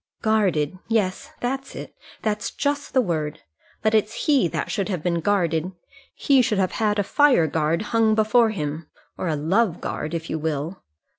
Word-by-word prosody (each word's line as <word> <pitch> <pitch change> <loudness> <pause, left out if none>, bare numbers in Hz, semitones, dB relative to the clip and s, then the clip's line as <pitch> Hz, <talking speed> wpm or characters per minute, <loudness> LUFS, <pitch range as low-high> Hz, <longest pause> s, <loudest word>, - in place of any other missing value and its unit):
"Guarded! 185 -7 +1
Yes, 225 +4 0
that's 270 +2 -3
it; - - -8 0.3
that's 210 -1 -1
just 285 0 -2
the 260 - +6
word. 155 -7 -2 0.4
But 215 0 +2
it's 220 +1 0
he 280 - +4
that - - -3
should 200 -1 -1
have 180 -6 -3
been 170 -1 0
guarded. 175 -2 0 0.4
He 275 -2 +4
should 215 -3 0
have 190 -1 +1
had 210 -1 +2
a 205 - +2
fire 260 - +4
guard 160 +4 0
hung 225 -1 +4
before 220 +2 +4
him 155 -5 -4 0.3
or - - -4
a 160 - 0
love 180 +6 +1
guard, 155 +2 -4
if 165 0 -4
you 160 - -3
will. 155 +3 -3
195 Hz, 175 wpm, -23 LUFS, 160-225 Hz, 0.4 s, the